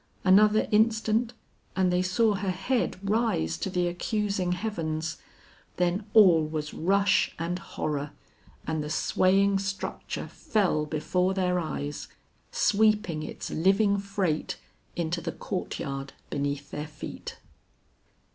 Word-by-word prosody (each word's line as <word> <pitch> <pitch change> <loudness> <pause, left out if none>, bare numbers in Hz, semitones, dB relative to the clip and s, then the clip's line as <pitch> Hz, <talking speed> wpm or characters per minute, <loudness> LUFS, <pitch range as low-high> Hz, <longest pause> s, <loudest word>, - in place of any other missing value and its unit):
Another 210 +3 +5
instant 220 +2 +2 0.4
and 185 -1 +2
they 180 - +3
saw 205 +4 +2
her 195 0 -2
head 195 +7 0
rise 205 - +1
to - - -2
the 180 -1 0
accusing 195 0 -1
heavens, 165 -5 -3 0.6
then 180 +4 0
all 185 -7 +8
was 155 -1 -4
rush 195 +4 +2
and 170 +2 -2
horror, 150 -4 -3 0.6
and 160 -1 -1
the 150 - -5
swaying 195 +4 +3
structure 195 0 -4
fell 180 -8 0
before 180 +5 0
their 180 -1 +1
eyes, 145 -3 -4 0.4
sweeping 210 -6 +2
its - - -6
living 200 +4 +3
freight 195 -5 -1 0.4
into 170 0 -1
the 165 +1 -3
courtyard 135 -7 -4 0.2
beneath 140 0 -2
their 150 +1 -4
feet. 150 -1 -8
180 Hz, 120 wpm, -27 LUFS, 155-200 Hz, 0.6 s, all